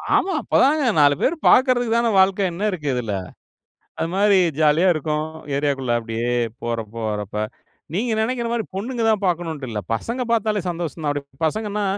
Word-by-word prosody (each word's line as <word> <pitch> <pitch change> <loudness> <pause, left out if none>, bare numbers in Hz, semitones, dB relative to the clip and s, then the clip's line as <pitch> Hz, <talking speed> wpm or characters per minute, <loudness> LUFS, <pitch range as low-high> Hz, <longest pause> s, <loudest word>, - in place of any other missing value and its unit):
ஆமா, 380 - +2
அப்பதாங்க 290 +3 +3 0.2
4 145 -1 +5
பேரு 315 - +2
பாக்குறதுக்கு 245 -3 +4
தானே 235 0 +2
வாழ்க்க 190 0 +3
என்ன 190 +5 -3
இருக்கு 160 -6 -5
இதுல? 115 -5 -2 0.9
அது 165 - -1
மாரி 200 0 +4 0.2
ஜாலியா 160 +4 +4
இருக்கும். 155 0 -1 0.3
ஏரியாக்குள்ள 140 -3 0
அப்டியே 115 +1 -3 0.3
போறப்ப, 115 -2 -4 0.2
வரப்ப. 105 0 -3 0.5
நீங்க 225 +5 0
நெனைக்கிற 235 +1 -1
மாரி 235 -2 -1
பொண்ணுங்க 230 +5 -3
தான் 215 -2 +1
பாக்கணும்ண்ட்டு 165 -6 -2
இல்ல. 105 -2 -3
பசங்க 235 - -3
பாத்தாலே 215 -2 +1
சந்தோஷம்தான். 165 -3 -3
அப்டி 140 -2 -8
பசங்கன்னா, 210 +4 -2
175 Hz, 150 wpm, -22 LUFS, 140-220 Hz, 0.9 s, 4